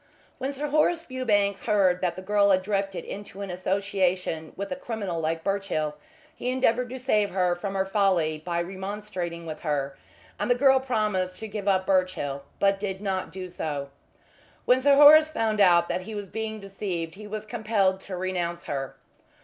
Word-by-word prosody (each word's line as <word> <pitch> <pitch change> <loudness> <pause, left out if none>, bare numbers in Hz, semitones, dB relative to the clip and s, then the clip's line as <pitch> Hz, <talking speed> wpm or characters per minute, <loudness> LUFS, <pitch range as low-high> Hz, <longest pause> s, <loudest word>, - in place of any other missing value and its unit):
When 265 +2 -2
Sir 290 +2 -4
Horace 320 +3 +2
Fewbanks 205 - 0
heard 190 -5 +3
that 180 -2 0
the 185 - -8
girl 205 +1 +3
had 185 -1 +3
drifted 195 -1 -2
into 200 -1 -8
an 200 -2 -4
association 185 -3 -1
with 200 +5 -5
a - - -1
criminal 215 -10 -4
like 160 +1 -1
Birchill 195 -7 -1 0.4
he 250 - -3
endeavoured 250 -1 +1
to 260 - -5
save 215 -6 +1
her 180 -2 +1
from 195 +2 -5
her 190 0 +1
folly 185 -6 +1
by 170 0 -1
remonstrating 190 -2 -5
with 155 -1 -6
her, 140 -3 -1 0.4
and - - -1
the 245 - +5
girl 265 +1 +5
promised 210 -8 -1
to 220 - -4
give 205 -1 -5
up 190 -1 +3
Birchill, 185 -8 0 0.2
but 195 0 +3
did 195 -2 -3
not 195 -2 -2
do 185 -1 -6
so. 145 -5 -4 0.7
When 250 +1 +4
Sir 280 +1 +5
Horace 305 +2 +9
found 220 -7 0
out 175 -3 +6
that - - -2
he 220 +3 -7
was 205 -2 -6
being 220 +1 -4
deceived 190 -4 -4
he 210 +2 -10
was 215 0 -5
compelled 210 -4 +1
to 190 -1 -7
renounce 175 -2 -2
her. 135 -1 -4
195 Hz, 180 wpm, -26 LUFS, 180-215 Hz, 0.7 s, Horace